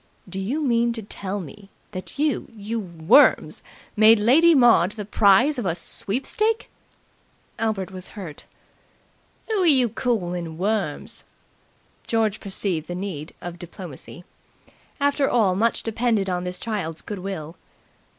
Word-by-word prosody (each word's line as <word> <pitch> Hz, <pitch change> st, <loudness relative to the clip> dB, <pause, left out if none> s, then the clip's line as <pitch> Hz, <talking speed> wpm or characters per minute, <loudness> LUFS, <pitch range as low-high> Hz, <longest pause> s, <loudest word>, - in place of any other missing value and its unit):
"Do 190 Hz, +1 st, -5 dB
you 260 Hz, +11 st, -2 dB
mean 235 Hz, -3 st, +2 dB
to 225 Hz, -2 st, -6 dB
tell 200 Hz, 0 st, -5 dB
me 200 Hz, +2 st, -11 dB, 0.2 s
that 185 Hz, -2 st, -8 dB
you 295 Hz, 0 st, 0 dB
you 220 Hz, +2 st, -4 dB
worms 175 Hz, -, +3 dB, 0.3 s
made 220 Hz, +1 st, +7 dB
Lady 300 Hz, +11 st, +5 dB
Maud 230 Hz, -8 st, +5 dB
the 210 Hz, -, -6 dB
the -, -, -12 dB
prize 220 Hz, +8 st, +4 dB
of 235 Hz, -, -3 dB
a 170 Hz, -, 0 dB
sweepstake!" 420 Hz, -, -2 dB, 0.9 s
Albert 210 Hz, -4 st, -1 dB
was 185 Hz, -1 st, -6 dB
hurt. 170 Hz, -7 st, -7 dB, 1.0 s
"Who're 400 Hz, -5 st, +1 dB
yer 260 Hz, -6 st, +4 dB
calling 180 Hz, -9 st, -2 dB
worms?" 195 Hz, -5 st, -2 dB, 0.8 s
George 220 Hz, -2 st, +1 dB
perceived 190 Hz, -5 st, -2 dB
the 175 Hz, -, -5 dB
need 180 Hz, -5 st, -6 dB
of 175 Hz, 0 st, -7 dB
diplomacy. 175 Hz, -2 st, -10 dB, 0.8 s
After 285 Hz, 0 st, +2 dB
all 215 Hz, -6 st, +3 dB
much 225 Hz, +5 st, +1 dB
depended 225 Hz, -4 st, 0 dB
on 180 Hz, 0 st, -2 dB
this 180 Hz, 0 st, -3 dB
child's 190 Hz, -8 st, -4 dB
goodwill. 185 Hz, -5 st, -6 dB
205 Hz, 130 wpm, -23 LUFS, 180-235 Hz, 1.0 s, made